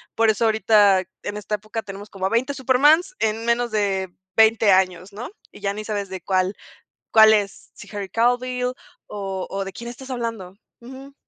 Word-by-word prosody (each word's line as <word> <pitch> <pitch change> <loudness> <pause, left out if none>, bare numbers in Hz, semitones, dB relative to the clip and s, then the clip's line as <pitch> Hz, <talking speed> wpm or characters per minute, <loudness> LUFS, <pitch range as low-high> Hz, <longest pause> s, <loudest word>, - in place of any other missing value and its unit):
Por 225 -1 +3
eso 220 +2 +1
ahorita 210 -3 +4 0.2
en 205 0 -4
esta 210 0 -3
época 215 +2 -6
tenemos 200 0 -9
como 190 -1 -2
a - - -3
20 250 +6 0
Supermans 290 - +3
en 220 +1 -1
menos 235 0 +1
de 195 -3 0 0.3
20 220 -2 +5
años, 185 0 +1
¿no? 235 +7 -7 0.2
Y - - -14
ya 200 0 -2
ni 215 +1 -6
sabes 205 -2 -3
de 190 -2 -6
cuál 185 +1 0 0.6
cuál 220 -1 +7
es, 200 -2 -2
si 210 - -13
Harry 200 -2 -4
Cavill, 250 +1 0 0.4
o 195 -2 -5
o 195 0 -3
de 195 - -7
quién 235 +3 -8
estás 260 +2 -11
hablando. 230 -7 -5 0.3
Ujú. 265 +3 -12
215 Hz, 185 wpm, -22 LUFS, 195-240 Hz, 0.6 s, cuál